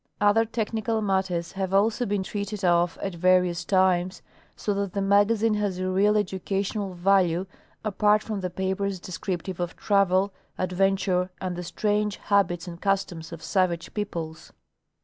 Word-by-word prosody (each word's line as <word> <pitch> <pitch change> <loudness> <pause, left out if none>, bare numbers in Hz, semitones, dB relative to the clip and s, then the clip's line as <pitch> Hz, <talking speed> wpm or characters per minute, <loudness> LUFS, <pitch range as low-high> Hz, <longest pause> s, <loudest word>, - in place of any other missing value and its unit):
Other 210 +2 +4
technical 225 0 -2
matters 190 -4 0
have 190 0 -2
also 220 +4 +2
been 200 -1 0
treated 205 0 -4
of 175 0 +3
at 195 - -2
various 180 0 +2
times, 185 -1 +2 0.3
so 205 - -1
that 200 -2 -2
the 200 - -1
magazine 205 +3 +3
has 205 -3 -1
a 185 0 -1
real 205 +3 +3
educational 195 0 -2
value 180 -1 +2 0.4
apart 210 0 +3
from 215 -2 -3
the 185 -1 -3
papers 190 +1 -2
descriptive 180 0 -5
of 175 -1 -3
travel, 195 -1 +2 0.2
adventure 185 0 +1
and 185 -1 -3
the 175 - -4
strange 210 +3 0
habits 185 -3 +1
and 170 0 -8
customs 190 -5 -1
of 165 -1 -8
savage 180 -4 0
peoples. 170 -7 -5
190 Hz, 150 wpm, -26 LUFS, 180-205 Hz, 0.4 s, Other